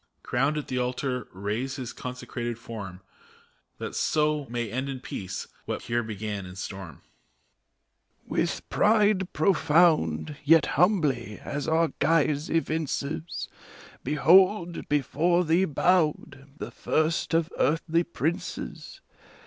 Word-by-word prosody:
Crowned, 135 +5 +1
at 150 - -4
the 125 - -2
altar 125 0 -2
raise 105 +8 -3
his 125 -3 -6
consecrated 120 -2 -5
form, 100 -6 -8 0.8
That - - -5
so 150 -2 +1
may 120 -3 -3
end 130 +3 -2
in 135 -1 -4
peace 95 -5 -6 0.2
what - - -4
here 120 +1 0
began 105 -2 -4
in 90 - -10
storm! 95 -1 -6
ARCH 75 - -14
CHANCELLOR. 65 0 -39
With - - -2
pride 210 -3 +3
profound, 155 - +3
yet 160 +1 +6
humbly, 150 - +2
as 145 +2 -4
our 160 0 +3
guise 150 -2 +2
evinces, 160 0 -2 0.6
Behold, 175 +4 +4
before 165 +5 +2
thee 170 +4 +3
bowed, 155 -4 +1
the - - -6
first 160 +1 0
of 165 0 +1
earthly 165 +3 +2
princes 165 0 -4
145 Hz, 120 wpm, -27 LUFS, 120-165 Hz, 0.8 s, yet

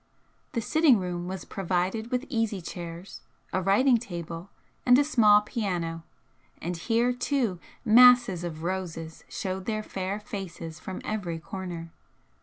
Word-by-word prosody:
The 230 - 0
sitting 310 0 +4
room 180 -2 -3
was 190 0 -5
provided 190 +4 -1
with 250 +2 -1
easy 225 -5 -1
chairs, 170 +1 -8 0.3
a 190 - +1
writing 235 +6 +4
table, 170 -4 -6 0.3
and 245 0 +6
a 290 - +5
small 215 -8 +5
piano, 180 -7 -3 0.6
and 175 +1 -3
here, 235 +7 +1
too, 245 -7 0 0.3
masses 240 -5 +7
of 160 -2 -5
roses 170 -3 -4
showed 190 -1 -4
their 215 -1 -2
fair 195 0 -3
faces 190 -7 -7
from 190 - -6
every 185 -6 -2
corner. 175 -2 -6
190 Hz, 135 wpm, -27 LUFS, 175-225 Hz, 0.6 s, masses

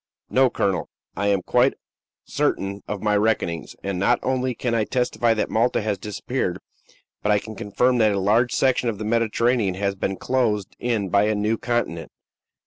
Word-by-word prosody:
"No, 130 0 +4
colonel, 95 -6 -1 0.3
I 100 - -1
am 100 -2 +2
quite - - +3 0.5
certain 100 +1 -1
of 105 -1 -4
my 105 -1 +2
reckonings; 100 -8 0
and 95 -2 -2
not 100 - +3
only 130 -1 0
can 120 0 -2
I 115 -2 +2
testify 120 -1 +1
that 110 - -1
Malta 115 +3 +2
has 105 -3 -1
disappeared, 105 -1 -3 0.6
but 105 - +1
I 105 - +5
can 110 +2 -6
affirm 125 +4 +2
that 110 -2 +4
a 100 - 0
large 110 +6 +2
section 130 -2 +2
of 110 - -3
the 105 - -5
Mediterranean 115 -2 +1
has 100 +1 -1
been 95 0 -3
closed 110 -7 0
in 115 -5 -1
by 100 +3 +3
a 110 0 +1
new 105 +2 +1
continent. 115 -9 -2
105 Hz, 180 wpm, -23 LUFS, 100-120 Hz, 0.6 s, I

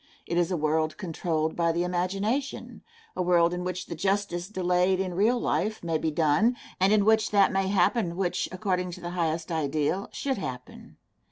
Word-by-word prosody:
It 170 - -3
is 175 -1 +2
a 180 - -1
world 155 0 0
controlled 160 -4 -2
by 170 -1 +2
the 170 +1 0
imagination 195 +10 -2 0.3
a - - -1
world 175 -1 +3
in 180 0 -3
which 180 0 -4
the - - -6
justice 190 0 -1
delayed 185 -1 +1
in 185 -2 -2
real 220 +7 +2
life 205 +6 -1
may 165 -2 0
be 160 - 0
done, 160 +10 +2 0.2
and 190 +2 +4
in 210 -2 +4
which 220 0 +3
that 200 -2 +4
may 195 -1 0
happen 190 -1 +1
which, 180 -1 -1
according 185 -1 -1
to 180 - -8
the 175 0 -5
highest 165 -1 -2
ideal, 155 +4 -1
should 270 -6 -2
happen. 125 -7 -8
180 Hz, 185 wpm, -27 LUFS, 170-195 Hz, 0.3 s, and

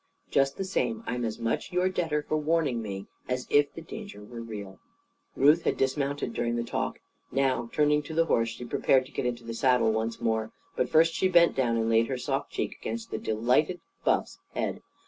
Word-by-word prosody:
Just 135 0 +2
the 195 - -1
same, 225 +4 -1
I'm 125 0 -2
as 110 -2 -2
much 115 -1 -2
your 180 +1 +2
debtor 160 -5 0
for - - 0
warning 155 -5 +1
me, 100 -3 -5 0.2
as 125 0 -1
if 145 0 +4
the 165 - -9
danger 200 - -8
were 115 +2 -8
real." 105 -4 -7 0.6
Ruth 150 +5 +5
had - - 0
dismounted, 140 -1 -1
during 120 0 -1
the 120 - -1
talk. 115 - -2 0.3
Now, 130 -3 +1
turning 150 0 +3
to 155 +2 -8
the 165 0 +4
horse, 115 -7 +2
she 115 +2 -7
prepared 130 +2 +3
to 135 - -15
get 125 - -1
into 120 -1 -3
the 115 0 -5
saddle 120 -2 +3
once 110 +1 -2
more. 110 -1 -1 0.2
But 125 - 0
first 165 +1 +5
she 190 - +2
bent 170 -2 +5
down 120 -3 +1
and 115 0 +1
laid 115 0 +4
her 130 - -2
soft 125 - -2
cheek - - -3
against 115 0 -5
the - - -2
delighted 125 +11 +1 0.2
Buff's - - +1 0.2
head. - - -2
125 Hz, 205 wpm, -28 LUFS, 115-150 Hz, 0.6 s, Ruth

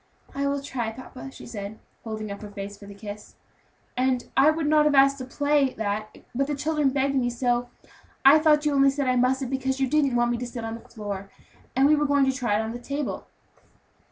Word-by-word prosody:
"I 280 0 -1
will 280 0 -1
try, 245 -5 -3
papa," 255 +3 -10
she - - -12
said, 210 -2 -7 0.3
holding 215 -2 -5
up 200 - -7
her 210 - -8
face 200 0 -7
for 200 0 -13
the 200 - -10
kiss; 205 0 -9 0.6
"and 255 -1 0
I 275 +3 +6
would 315 0 0
not 300 0 +4
have 295 -1 +3
asked 275 0 +5
to 255 - -5
play 285 0 +1
that, 215 0 -3 0.2
but 275 +3 0
the 295 - -1
children 300 0 +1
begged 275 +1 0
me 255 -3 +1
so, 245 0 0 0.2
and - - -25 0.3
I 285 +3 +9
thought 305 -1 +4
you 295 - +2
only 275 0 +5
said 275 0 -1
I 255 - +3
mustn't, 255 +1 +1
because 265 0 -1
you 270 - +2
didn't 280 -2 +2
want 240 0 +2
me 240 - -1
to 245 - -4
sit 235 -2 -6
on 225 - -4
the 230 - -10
floor; 200 -3 -6 0.5
and 270 +2 +5
we 305 - +5
were 295 0 +1
going 285 -1 +3
to 265 - +2
try 240 -6 0
it 220 - 0
on 220 - -4
the 240 - -6
table." 280 +3 -4
260 Hz, 240 wpm, -25 LUFS, 225-280 Hz, 0.6 s, I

